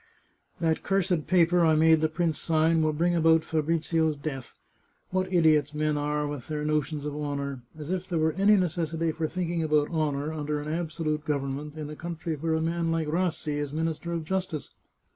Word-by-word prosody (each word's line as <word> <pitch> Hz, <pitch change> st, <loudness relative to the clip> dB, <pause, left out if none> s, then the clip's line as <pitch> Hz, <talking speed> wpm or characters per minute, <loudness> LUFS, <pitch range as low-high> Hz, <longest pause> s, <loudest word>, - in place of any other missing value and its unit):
" -, -, -44 dB, 0.2 s
That 160 Hz, -2 st, +1 dB
cursed 185 Hz, -4 st, 0 dB
paper 175 Hz, 0 st, +4 dB
I 160 Hz, -1 st, +5 dB
made 160 Hz, 0 st, +5 dB
the 155 Hz, -, +2 dB
prince 160 Hz, -2 st, -1 dB
sign 160 Hz, 0 st, +2 dB
will 155 Hz, 0 st, +2 dB
bring 170 Hz, +3 st, +1 dB
about 165 Hz, -1 st, +4 dB
Fabrizio's 160 Hz, 0 st, 0 dB
death! 140 Hz, -3 st, -6 dB, 0.5 s
What 185 Hz, 0 st, -1 dB
idiots 155 Hz, -4 st, +3 dB
men 150 Hz, 0 st, +1 dB
are, 150 Hz, 0 st, -1 dB
with 145 Hz, -4 st, -5 dB
their 150 Hz, -1 st, -3 dB
no 155 Hz, 0 st, +2 dB
tions 150 Hz, 0 st, -6 dB
of 145 Hz, -1 st, -3 dB
honour! 140 Hz, -3 st, -3 dB, 0.2 s
As 155 Hz, +2 st, -6 dB
if 185 Hz, 0 st, -3 dB
there 175 Hz, -, 0 dB
were 160 Hz, 0 st, +2 dB
any 200 Hz, +5 st, +4 dB
necessity 165 Hz, -2 st, 0 dB
for 160 Hz, 0 st, -2 dB
thinking 170 Hz, 0 st, -2 dB
about 150 Hz, -1 st, +2 dB
honour 155 Hz, -2 st, -1 dB
under 150 Hz, -1 st, -2 dB
an 150 Hz, +1 st, -5 dB
absolute 160 Hz, -2 st, -2 dB
government 145 Hz, 0 st, -3 dB
in 155 Hz, -1 st, -5 dB
a -, -, -7 dB
country 170 Hz, 0 st, -4 dB
where 160 Hz, +2 st, -1 dB
a 160 Hz, -, 0 dB
man 165 Hz, 0 st, 0 dB
like 165 Hz, -2 st, 0 dB
Rassi 165 Hz, -3 st, -1 dB
is 145 Hz, -1 st, -3 dB
Minister 160 Hz, +2 st, -2 dB
of 165 Hz, -1 st, -2 dB
Justice 185 Hz, -3 st, -3 dB
160 Hz, 200 wpm, -27 LUFS, 150-170 Hz, 0.5 s, I